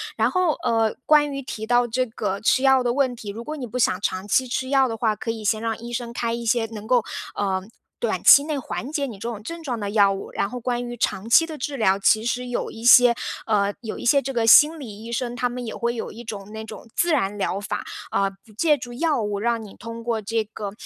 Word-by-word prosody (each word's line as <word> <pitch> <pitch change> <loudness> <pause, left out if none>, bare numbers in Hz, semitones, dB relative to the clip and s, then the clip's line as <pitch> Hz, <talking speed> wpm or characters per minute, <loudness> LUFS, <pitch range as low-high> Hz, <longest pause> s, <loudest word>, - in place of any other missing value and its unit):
然 - - +2
后， 365 -4 +2
呃， 225 -3 +1
关 295 -1 +4
于 275 0 -4
提 220 -4 -6
到 245 0 +3
这 255 +3 0
个 200 -3 -3
吃 255 +4 +2
药 265 -1 +5
的 240 -1 0
问 260 -2 +1
题， 215 -3 -8
如 225 +4 -6
果 305 +3 -5
你 250 -4 -5
不 245 - -5
想 195 -6 +2
长 190 0 -2
期 255 +5 +2
吃 260 +1 -3
药 270 -1 +4
的 225 - -3
话， 220 -2 +1
可 230 - -6
以 225 -1 -3
先 215 +1 +1
让 225 -1 -2
医 235 +1 -9
生 235 -1 -4
开 235 -1 -2
一 235 0 -4
些 230 0 +2
能 215 -1 -9
够， 245 -3 +3 0.3
嗯， 190 0 -1 0.3
短 480 - -1
期 280 - +9
内 305 -2 -2
缓 260 0 -5
解 285 -2 -1
你 225 -6 -8
这 230 - -5
种 215 -3 -6
症 335 +6 -7
状 255 -6 -3
的 205 - -3
药 200 -2 +4
物。 195 - -7
然 200 - -1
后 250 - -6
关 245 0 -2
于 240 - -6
长 225 -2 -2
期 330 - +6
的 320 -2 -7
治 280 +2 -4
疗， 195 -4 +2
其 220 +2 +3
实 250 +1 -2
有 245 - -3
一 225 - -10
些 245 0 +8 0.3
嗯， 205 -2 +1
有 220 - -6
一 - - -7
些 280 +3 +4
这 270 +1 -4
个 230 -3 0
心 305 +7 +7
理 220 -5 -9
医 235 - -8
生， 240 +1 -2
他 245 0 0
们 245 0 -6
也 225 - -6
会 235 0 -1
有 225 - -5
一 235 +3 -10
种 205 -2 -7
那 220 - -6
种 220 +1 -10
自 345 -1 +2
然 205 -8 0
疗 195 0 -1
法， 205 - -4 0.3
嗯， 195 0 +1
不 215 - -18
借 300 +6 +2
助 245 -2 -8
药 305 -1 0
物， 205 -1 -2
让 235 -1 0
你 205 - -12
通 230 0 -8
过 230 -2 -1
这 225 +2 -1
个 210 -1 -6
235 Hz, 285 characters per minute, -23 LUFS, 215-255 Hz, 0.3 s, 期